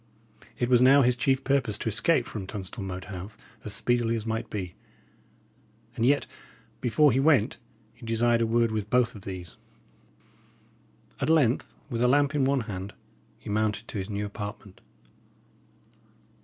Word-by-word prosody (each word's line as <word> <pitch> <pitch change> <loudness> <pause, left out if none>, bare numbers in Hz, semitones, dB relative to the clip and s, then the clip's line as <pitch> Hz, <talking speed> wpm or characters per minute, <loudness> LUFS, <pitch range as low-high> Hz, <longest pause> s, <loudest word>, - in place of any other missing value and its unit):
It 120 - 0
was 125 -1 +4
now 135 +2 +7
his 125 0 +3
chief 135 +2 +1
purpose 130 -7 +1
to - - -5
escape 125 - +2
from 100 -4 -6
Tunstall 100 0 -6
Moat 95 -1 -6
House 95 +2 -8 0.3
as 105 - -5
speedily 120 -1 +1
as 110 -1 -4
might 110 0 -3
be; 90 -4 -5 1.2
and - - -2
yet, 135 +1 +3 0.5
before 140 +4 +3
he 130 - +2
went, 135 -5 +3 0.3
he 120 +1 -19
desired 115 +1 +2
a 115 - +2
word 115 0 +2
with 105 -1 -3
both 125 0 +2
of 105 - -11
these. 90 -3 -8 1.6
At - - -1
length, 140 -7 +2 0.2
with 115 -1 -2
a - - +5
lamp 140 +3 +3
in 145 -3 +2
one 135 -1 +2
hand, 100 -3 -6 0.4
he - - -8
mounted 110 +1 -1
to 105 - -4
his 95 +2 -5
new 105 0 -2
apartment. 105 -1 -8
115 Hz, 160 wpm, -27 LUFS, 105-125 Hz, 1.6 s, now